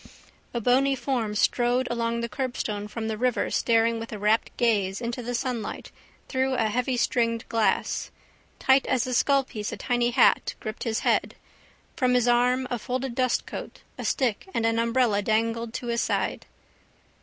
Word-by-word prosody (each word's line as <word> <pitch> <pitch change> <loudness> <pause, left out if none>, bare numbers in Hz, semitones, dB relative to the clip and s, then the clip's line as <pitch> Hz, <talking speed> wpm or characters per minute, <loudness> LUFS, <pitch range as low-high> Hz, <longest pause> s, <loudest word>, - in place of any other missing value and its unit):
A 240 - -2
bony 265 +4 +3
form 240 -6 -2
strode 245 +4 +2
along 235 0 -1
the 235 - -2
curbstone 220 -4 -3
from 220 +1 -5
the 220 -1 -3
river 250 -1 0
staring 230 0 +2
with 225 - -7
a 215 - -5
rapt 210 +2 +2
gaze 205 -5 +1
into 240 +1 -4
the 245 +1 -3
sunlight 235 -2 -4 0.4
through 260 0 0
a 225 -3 +1
heavystringed 240 -1 0
glass. 225 -2 0 0.5
Tight 265 0 +3
as 255 -2 +1
a 255 - -3
skullpiece 255 -5 +1
a - - -5
tiny 240 -1 +1
hat 245 +1 +3
gripped 215 +2 -6
his 225 -1 -1
head. - - +1 0.6
From 250 -1 +2
his 245 -1 +3
arm 250 +2 +3
a 245 - -1
folded 255 +2 -3
dustcoat, 255 0 -2
a - - -7
stick 255 - 0
and 225 - +1
an 225 0 +2
umbrella 230 -3 +2
dangled 225 +2 0
to - - -4
his 235 -1 0
stride. - - -1
235 Hz, 165 wpm, -26 LUFS, 225-255 Hz, 0.6 s, bony